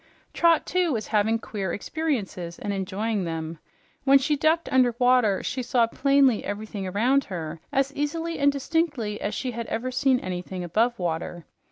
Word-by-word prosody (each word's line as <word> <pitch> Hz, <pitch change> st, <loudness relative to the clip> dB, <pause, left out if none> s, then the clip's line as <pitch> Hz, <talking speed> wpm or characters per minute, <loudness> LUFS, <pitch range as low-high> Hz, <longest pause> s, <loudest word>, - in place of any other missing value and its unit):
Trot, 335 Hz, -2 st, +3 dB
too, 360 Hz, -2 st, +1 dB
was 225 Hz, -5 st, -2 dB
having 215 Hz, +2 st, +3 dB
queer 205 Hz, -5 st, -4 dB
experiences 205 Hz, -, -3 dB
and 205 Hz, -, -3 dB
enjoying 200 Hz, +2 st, -2 dB
them. 165 Hz, -1 st, -4 dB, 0.4 s
When 275 Hz, 0 st, +7 dB
she 295 Hz, +3 st, +1 dB
ducked 320 Hz, +3 st, +2 dB
under 250 Hz, -3 st, +4 dB
water, 245 Hz, -6 st, +3 dB
she 255 Hz, -, -2 dB
saw 245 Hz, -1 st, +2 dB
plainly 275 Hz, -1 st, +3 dB
everything 205 Hz, -1 st, -5 dB
about 245 Hz, +9 st, +2 dB
her 165 Hz, -3 st, -5 dB
as 275 Hz, 0 st, +1 dB
easily 325 Hz, +3 st, -2 dB
and 285 Hz, 0 st, +4 dB
distinctly 280 Hz, -7 st, -1 dB
as 205 Hz, -, -2 dB
she 255 Hz, -, -2 dB
had 235 Hz, -1 st, -5 dB
ever 245 Hz, +3 st, -3 dB
seen 255 Hz, 0 st, +2 dB
anything 180 Hz, -1 st, -5 dB
above 225 Hz, +8 st, +1 dB
water. 170 Hz, -1 st, -3 dB
235 Hz, 165 wpm, -25 LUFS, 195-275 Hz, 0.4 s, When